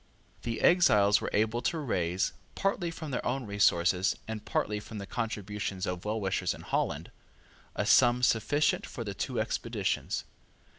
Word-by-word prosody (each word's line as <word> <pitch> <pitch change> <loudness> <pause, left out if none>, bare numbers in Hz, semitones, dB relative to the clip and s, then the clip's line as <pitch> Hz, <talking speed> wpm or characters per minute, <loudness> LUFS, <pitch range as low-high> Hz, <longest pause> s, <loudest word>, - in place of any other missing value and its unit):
The 115 -2 -3
exiles 105 - +5
were - - -2
able 110 +3 +1
to 145 +7 0
raise, 90 - 0 0.2
partly 195 -3 0
from 160 -3 -7
their 125 - -2
own 130 +1 -1
resources 95 -3 +2
and 110 -1 -5
partly 105 0 -1
from 105 +1 -9
the 100 - -5
contributions 105 -3 -3
of 90 0 -4
well 110 +1 -1
wishers 95 -2 -1
in - - -11
Holland, - - -2 0.6
a - - -1
sum 125 0 +5
sufficient 125 +6 +2
for 120 - -6
the 100 -3 -4
two 125 +3 -3
expeditions. 110 -2 -1
110 Hz, 155 wpm, -30 LUFS, 100-125 Hz, 0.6 s, exiles